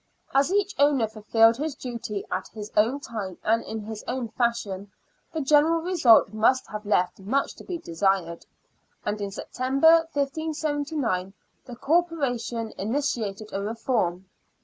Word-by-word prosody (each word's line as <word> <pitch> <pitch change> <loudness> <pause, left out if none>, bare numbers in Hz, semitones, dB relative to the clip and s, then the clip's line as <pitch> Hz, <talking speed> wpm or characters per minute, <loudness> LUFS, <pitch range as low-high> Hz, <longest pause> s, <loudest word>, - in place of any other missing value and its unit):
As 275 +5 +3
each 405 0 +1
owner 285 -5 +4
fulfilled 225 +1 +3
his 300 0 -3
duty 235 -6 -5
at - - -2
his 215 -1 -9
own 230 +7 +3
time 205 -8 -6
and 225 +2 +2
in 220 0 -5
his 215 0 -7
own 245 -2 -3
fashion, 215 -5 -2 0.4
the 320 - -2
general 300 +4 +4
result 305 - +4
must 230 +4 +3
have 210 0 -6
left 185 -3 +1
much 245 +9 -1
to - - -11
be 360 - -4
desired, 170 - -1 0.6
and 210 0 -2
in 200 - -2
September, 275 +10 +3
1579, 290 - -2 0.3
the 245 - -9
Corporation 250 -7 0
initiated 215 -3 -2
a 195 - -2
reform. 205 -4 -1
235 Hz, 140 wpm, -26 LUFS, 210-285 Hz, 0.6 s, owner